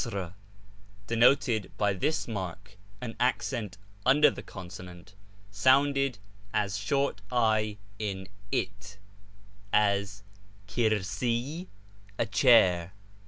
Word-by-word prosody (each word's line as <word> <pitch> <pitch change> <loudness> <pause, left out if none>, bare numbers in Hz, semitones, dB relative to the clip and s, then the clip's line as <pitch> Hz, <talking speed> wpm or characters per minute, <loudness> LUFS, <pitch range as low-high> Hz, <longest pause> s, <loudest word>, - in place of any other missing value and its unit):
denoted 115 -1 +3
by 105 -1 +2
this 155 +12 -1
mark 100 -1 -6 0.3
_ 115 -3 -1 0.3
under 150 +5 +5
the - - -8
consonant, 90 -1 -10 0.4
sounded 135 +4 +3 0.4
as 100 -1 0
short 105 +2 0
i 110 -3 +2 0.2
in 95 -3 -4
' 100 - -27
it,' 100 0 -14 0.7
as 100 -1 +1 0.2
[ 100 0 -27
^fkir»i, 120 - -1 0.2
' 100 0 -26
a - - +1
chair.' 95 -9 +4
105 Hz, 95 wpm, -29 LUFS, 100-120 Hz, 0.7 s, under